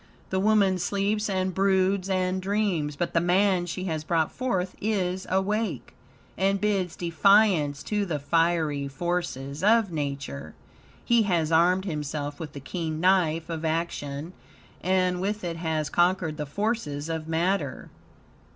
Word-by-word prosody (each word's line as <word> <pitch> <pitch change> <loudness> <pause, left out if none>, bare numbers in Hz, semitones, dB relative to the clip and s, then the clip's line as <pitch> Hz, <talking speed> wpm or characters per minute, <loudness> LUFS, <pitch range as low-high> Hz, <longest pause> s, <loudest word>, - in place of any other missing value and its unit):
The 190 - +1
woman 200 -2 +3
sleeps 205 +3 0
and 185 -1 0
broods 190 0 +2
and 185 0 0
dreams, 190 -7 0
but 175 +4 -2
the 165 - +4
man 180 0 +2
she 185 +2 -4
has 160 -4 -2
brought 160 -1 +1
forth 190 -8 -2
is 190 -3 -1
awake, 190 - -1 0.4
and 195 +1 +1
bids 195 -4 0
defiance 175 -4 +3
to 210 -1 -1
the 160 -4 -1
fiery 155 -1 +1
forces 140 -2 -3
of 220 -2 +4
Nature. 140 - -4 0.5
He 235 -1 +4
has 165 -3 +1
armed 180 +4 +4
himself 145 -3 -4
with 155 -3 -7
the 140 - -7
keen 160 +2 -4
knife 165 -3 +2
of 165 -2 -5
action, 160 -1 -3 0.5
and 185 -1 +1
with 210 +2 -2
it 170 -2 -3
has 160 -2 -2
conquered 175 -3 +1
the 150 -1 -4
forces 165 - -2
of 160 -1 -4
matter. 165 -3 -1
175 Hz, 140 wpm, -26 LUFS, 155-195 Hz, 0.5 s, the